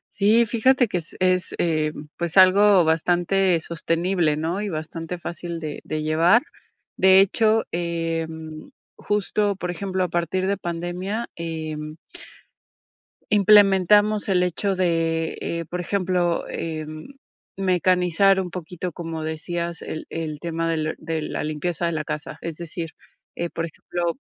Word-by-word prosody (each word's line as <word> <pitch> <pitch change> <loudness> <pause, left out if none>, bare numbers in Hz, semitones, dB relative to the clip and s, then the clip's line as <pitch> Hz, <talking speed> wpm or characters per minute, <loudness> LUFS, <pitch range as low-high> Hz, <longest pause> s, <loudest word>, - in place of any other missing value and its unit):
Sí, 215 +4 +4
fíjate 245 +3 +3
que 195 - -2
es 165 -1 -5
es, 185 0 +1
eh, 155 -2 0 0.2
pues, 170 +1 -3
algo 190 0 +7
bastante 175 +3 +2
sostenible, 165 0 0
¿no?, 165 +6 -2
y 210 - -3
bastante 165 +1 -5
fácil 170 0 -6
de 155 -2 -6
de 155 0 -3
llevar, 165 +9 +4 0.6
de 190 0 +7
hecho, 220 +3 +3
em, 165 -2 -3 0.4
justo, 205 0 0
por 180 -1 -4
ejemplo, 190 +1 -2
a 180 - -1
partir 175 +2 -1
de 200 0 0
pandemia, 175 +6 -4
em 155 -2 -5 1.4
implementamos 205 +1 +5
el 185 -2 +3
hecho 190 +2 -1
de, 165 -3 0
eh, 170 0 -3
por 180 - -3
ejemplo, 180 -2 0
eh, 155 -1 -4 0.7
mecanizar 185 0 +3
un 180 - -5
poquito, 180 0 -5
como 165 -1 -5
decías, 170 +2 -4
el 155 - -6
el 155 -2 -4
tema 165 -1 -2
del 155 -1 -1
de 160 -1 -3
la - - -3
limpieza 155 +3 -2
de 170 - 0
la 155 -1 -2
casa, 150 0 -6
es 165 -2 -5
decir, 170 0 -5 0.5
eh, 170 0 -2
por 165 - -3
ejemplo, 170 - -4
175 Hz, 140 wpm, -23 LUFS, 165-190 Hz, 1.4 s, algo